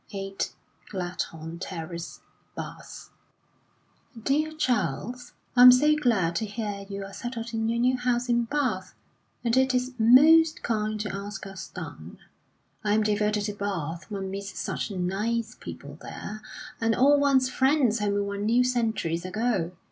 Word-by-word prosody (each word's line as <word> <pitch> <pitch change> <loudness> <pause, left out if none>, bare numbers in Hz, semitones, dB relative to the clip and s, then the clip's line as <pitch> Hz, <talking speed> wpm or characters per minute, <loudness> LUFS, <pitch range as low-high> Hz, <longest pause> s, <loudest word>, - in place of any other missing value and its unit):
8 195 -1 -3 0.4
Gladhorn 170 -3 -5
Terrace, 170 -2 -6 0.3
Bath: - - -8 1.1
"DEAR 300 +6 0
CHARLES, 245 - -1 0.2
I 245 - +6
am 250 0 +12
so 295 +5 +5
glad 215 - +1
to 220 - -1
hear 205 -2 -5
you 200 0 -5
are 195 - -10
settled 235 -1 -5
in 225 0 0
your 230 - 0
new 250 +2 +3
house 245 0 0
in 235 -1 +2
Bath, 235 -8 -2 0.5
and 235 -1 +2
it 260 0 +3
is 250 +1 0
most 310 +8 +6
kind 215 -1 -1
to 210 -2 -3
ask 200 0 -6
us 195 -1 -8
down. - - -9 0.7
I 210 0 +2
am 220 - +3
devoted 210 0 +1
to 205 0 -2
Bath; 175 -4 -4
one 195 -2 -4
meets 195 0 -6
such - - -3
nice 210 +5 -1
people - - -9
there, 215 +1 -7 0.4
and 225 0 +2
all 285 +4 +5
one's 265 -2 +3
friends 265 -4 +3
whom 205 -1 0
one 200 +1 -3
knew 240 +3 +4
centuries 225 -9 0
ago. 195 -2 -1
220 Hz, 150 wpm, -27 LUFS, 195-250 Hz, 1.1 s, am